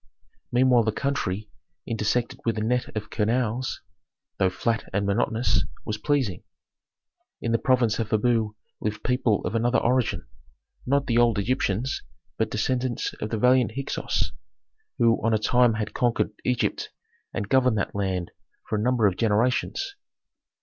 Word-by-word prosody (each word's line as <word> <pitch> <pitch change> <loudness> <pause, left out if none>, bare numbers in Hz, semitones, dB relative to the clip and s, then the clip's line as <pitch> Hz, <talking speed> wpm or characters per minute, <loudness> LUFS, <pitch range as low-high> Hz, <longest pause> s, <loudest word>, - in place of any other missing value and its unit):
Meanwhile 125 -2 +4
the 110 - +2
country, 105 -6 -2 0.4
intersected 115 +1 -1
with 115 -1 0
a 105 - -1
net 125 +2 +1
of 105 - -5
canals, 120 +2 0 0.6
though 95 - +4
flat 115 +4 -2
and 100 +1 0
monotonous, 115 +3 +1 0.2
was 105 0 -3
pleasing. 130 - 0 1.0
In 115 - -2
the 115 - +2
province 125 -4 +2
of 110 -2 -1
Habu 110 -1 +1 0.2
lived 105 0 -3
people 125 -4 +1
of - - -2
another 120 +2 +2
origin: 125 -1 +1 0.6
not 140 +2 +2
the 120 -2 +2
old 120 -3 +4
Egyptians, 120 +2 0 0.4
but - - +1
descendants 130 -2 -1
of 105 - -2
the 110 - -1
valiant 125 0 +4
Hyksos, 135 +2 -2 0.7
who 115 -1 +3
on 115 0 +3
a - - +4
time 120 +1 +3
had 110 -1 -3
conquered 120 -1 +1
Egypt 125 -2 0 0.4
and 100 - -3
governed 125 -2 +3
that 100 - -1
land 95 -3 -2 0.4
for 110 - -1
a - - -1
number 120 -1 +2
of 95 -3 +2
generations. 120 - +1
115 Hz, 150 wpm, -25 LUFS, 105-125 Hz, 1.0 s, Meanwhile